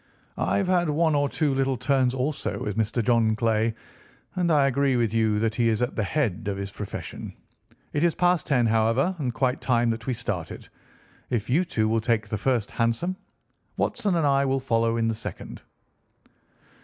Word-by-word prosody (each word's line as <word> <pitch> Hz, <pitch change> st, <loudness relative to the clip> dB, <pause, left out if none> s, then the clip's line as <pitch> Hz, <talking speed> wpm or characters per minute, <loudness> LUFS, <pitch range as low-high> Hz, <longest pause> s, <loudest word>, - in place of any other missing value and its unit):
I've 195 Hz, -, +1 dB
had 175 Hz, -3 st, +2 dB
one 160 Hz, +1 st, +2 dB
or 145 Hz, -1 st, +2 dB
two 145 Hz, -1 st, 0 dB
little 135 Hz, -1 st, 0 dB
turns 130 Hz, -1 st, +1 dB
also 140 Hz, +3 st, -2 dB
with 105 Hz, -, -4 dB
Mr. 115 Hz, +2 st, 0 dB
John 115 Hz, -2 st, +3 dB
Clay, 115 Hz, -1 st, +1 dB, 0.6 s
and 180 Hz, -2 st, +1 dB
I 150 Hz, -4 st, +4 dB
agree 140 Hz, 0 st, +2 dB
with 115 Hz, -3 st, +1 dB
you 110 Hz, -2 st, +2 dB
that 110 Hz, +1 st, 0 dB
he 115 Hz, 0 st, +2 dB
is 110 Hz, -1 st, +1 dB
at 125 Hz, -, -2 dB
the 110 Hz, -, 0 dB
head 110 Hz, -3 st, -1 dB
of 100 Hz, -1 st, -2 dB
his 100 Hz, 0 st, -5 dB
profession. 105 Hz, 0 st, -7 dB, 0.6 s
It 145 Hz, -, 0 dB
is 170 Hz, -2 st, +2 dB
past 180 Hz, -1 st, +2 dB
ten, 125 Hz, -5 st, +3 dB
however, 115 Hz, +10 st, +2 dB
and 130 Hz, -4 st, -1 dB
quite 125 Hz, +2 st, -1 dB
time 120 Hz, -2 st, +2 dB
that 115 Hz, +1 st, -5 dB
we 130 Hz, -, 0 dB
started. 100 Hz, -9 st, -5 dB, 0.6 s
If 120 Hz, -1 st, -2 dB
you 165 Hz, +7 st, +3 dB
two 110 Hz, -11 st, 0 dB
will 110 Hz, 0 st, +1 dB
take 110 Hz, -1 st, 0 dB
the 105 Hz, -, -2 dB
first 120 Hz, -2 st, 0 dB
hansom, 115 Hz, +11 st, 0 dB, 0.6 s
Watson 200 Hz, -4 st, 0 dB
and 165 Hz, -3 st, +1 dB
I 140 Hz, -1 st, +3 dB
will 135 Hz, 0 st, +1 dB
follow 115 Hz, -3 st, +1 dB
in 115 Hz, -1 st, +1 dB
the 115 Hz, -, +1 dB
second." 110 Hz, -, -7 dB
120 Hz, 190 wpm, -25 LUFS, 110-140 Hz, 0.6 s, I